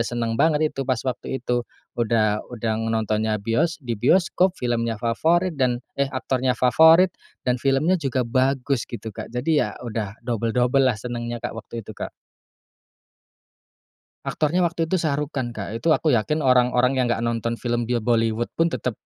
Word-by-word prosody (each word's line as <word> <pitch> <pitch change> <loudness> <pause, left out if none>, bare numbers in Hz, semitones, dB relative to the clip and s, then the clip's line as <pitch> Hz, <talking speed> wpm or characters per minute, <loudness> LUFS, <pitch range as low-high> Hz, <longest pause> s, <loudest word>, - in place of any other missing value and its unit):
seneng 115 -1 -1
banget 155 -1 +3
itu - - -5
pas 130 - +2
waktu 130 0 -4
itu, 120 -1 +1 0.4
udah 110 -2 +2
udah 115 -2 -2 0.2
nontonnya 110 -1 0
bios 115 +11 0
di 120 - -2
bioskop, 185 - +3
filmnya 115 -2 -1
favorit 165 - +1
dan 125 -2 +2 0.2
eh 140 - +2
aktornya 130 -1 -1
favorit 160 +8 +6 0.3
dan 125 -1 0
filmnya 150 +7 +2
juga 130 -4 0
bagus 130 +1 0
gitu 115 -2 -7
Kak - - -7
jadi 125 +6 -2
ya - - 0 0.2
udah 110 -3 -4
double-double 125 +3 +2
lah 120 - 0
senengnya 120 +1 -4
Kak - - -2
waktu 115 0 -8
itu, 110 - -9
Kak. - - -5 2.2
Aktornya 165 +4 +1
waktu 165 -1 -1
itu 190 - +1
Shah 155 -4 0
Rukh 150 - -3
Khan 120 -3 -2
Kak, 105 0 -5
itu 140 +9 -2
aku 155 +1 +1
yakin 150 +8 0
orang-orang 125 -1 +3
yang 130 - +2
gak - - -1
nonton 115 0 -2
film 120 -1 -1
bil 120 0 -1
Bollywood 115 0 +1
pun 165 0 +2
tetap 125 -4 -3
125 Hz, 165 wpm, -23 LUFS, 115-140 Hz, 2.2 s, favorit